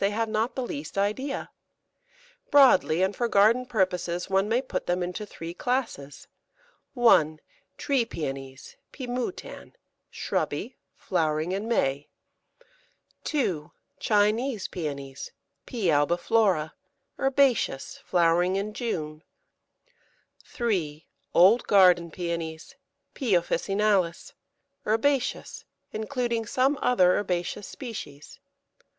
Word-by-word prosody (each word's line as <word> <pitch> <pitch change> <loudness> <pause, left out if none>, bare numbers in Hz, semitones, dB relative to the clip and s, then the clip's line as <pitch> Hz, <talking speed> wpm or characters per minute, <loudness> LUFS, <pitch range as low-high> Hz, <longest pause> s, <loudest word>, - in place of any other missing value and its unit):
they 195 - +3
have 225 +2 -1
not 220 +3 -1
the 260 - -2
least 285 -3 -6
idea. 215 +8 -2 1.0
Broadly, 190 - +5
and 190 +2 0
for 240 - 0
garden 230 +4 +4
purposes, 180 -5 -1
one 195 +2 +2
may 235 +2 +3
put 260 - -4
them 180 0 0
into 180 +4 -5
three 165 -3 -8
classes 225 - -3 0.7
1. 160 - +4 0.4
Tree 275 -4 +1
Pæonies 135 - -7
(P. 260 - -7
moutan), 250 +7 -5 0.4
shrubby, - - -3 0.2
flowering 155 +1 -1
in 200 +3 -3
May. 140 -11 0 1.2
2. 180 - -1 0.3
Chinese 215 +2 +1
Pæonies 140 -5 -6 0.4
(P. 235 -6 -4
albiflora), 170 +3 +2 0.5
herbaceous, 270 - +1
flowering 175 +1 +2
in 205 +2 -2
June. 155 -10 -4 1.2
3. 170 - -2 0.3
Old 195 +8 +6
garden 180 -4 +5
Pæonies 170 +1 -5 0.4
(P. 235 -8 +1
officinalis), 195 +1 0 0.5
herbaceous, 250 +5 0 0.3
including 230 0 -2
some 265 +5 +1
other 185 -8 +4
herbaceous 185 0 -3
species. 200 - -9
195 Hz, 100 wpm, -26 LUFS, 170-235 Hz, 1.2 s, Old